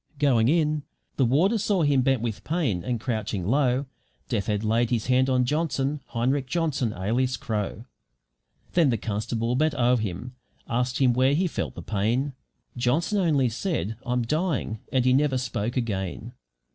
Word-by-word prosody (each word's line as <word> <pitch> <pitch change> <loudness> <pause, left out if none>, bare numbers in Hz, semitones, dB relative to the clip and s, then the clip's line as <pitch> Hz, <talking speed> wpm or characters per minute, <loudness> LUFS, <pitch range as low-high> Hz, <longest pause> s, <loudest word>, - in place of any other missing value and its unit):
Going 125 -6 +3
in, 155 0 +2 0.4
the 135 - +4
warder 175 - +3
saw 200 -3 +1
him 145 -3 +3
bent 130 -2 +1
with 115 -3 -3
pain 145 - -1
and 125 -2 -2
crouching 110 -5 -2
low 130 +3 +2 0.4
Death 110 -6 -1
had 105 -1 0
laid 115 +2 +2
his 115 -3 0
hand 130 +1 +3
on 125 -1 +3
Johnson, 145 -1 -1
Heinrich 130 +3 0
Johnson, 145 -6 0
alias 120 +7 0
Crow. 110 0 -3 0.9
Then 165 -5 +4
the 115 - +1
constable 115 +3 -2
bent 155 +2 +1
o'er 125 -1 +3
him 110 +3 -4 0.3
asked 125 +2 0
him 130 -3 +4
where 130 +3 +3
he 185 +5 +2
felt 175 - -3
the - - -7
pain. 115 +7 0 0.4
Johnson 145 - +1
only 150 -8 +3
said, 120 - -2
"I'm 125 -1 0
dying" 150 - -1
and 130 -2 +2
he 130 - +5
never 140 0 +2
spoke 120 -1 -2
again. 110 0 -3
125 Hz, 165 wpm, -26 LUFS, 115-145 Hz, 0.9 s, he